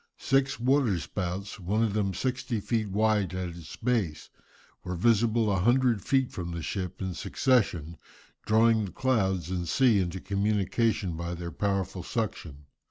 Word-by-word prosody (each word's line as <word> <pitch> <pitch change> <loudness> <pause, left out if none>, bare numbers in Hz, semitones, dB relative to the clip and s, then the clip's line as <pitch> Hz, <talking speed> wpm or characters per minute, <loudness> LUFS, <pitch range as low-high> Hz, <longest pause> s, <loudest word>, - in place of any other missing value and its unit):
Six 135 -2 +1
water 125 -5 +2
spouts, 95 +3 -4
one 100 +5 0
of 110 -3 0
them 100 -3 0
sixty 125 -3 -2
feet 110 0 -1
wide 105 -2 +1
at 90 -1 -3
its 85 -2 -9
base, 110 -10 -1 0.5
were 90 - -4
visible 110 +2 +3
a 95 - +1
hundred 120 +1 +3
feet 135 +2 +1
from 85 -1 -5
the 85 -1 -4
ship 95 +1 -4
in 95 -1 -3
succession, 85 - 0 0.5
drawing 110 0 +3
the 95 - -7
clouds 95 - 0
and 90 -3 -2
sea 120 - +4
into 90 0 -2
communication 100 -1 0
by 85 +1 -4
their 85 0 -6
powerful 95 0 -1
suction. 85 - -4
100 Hz, 155 wpm, -28 LUFS, 90-115 Hz, 0.5 s, sea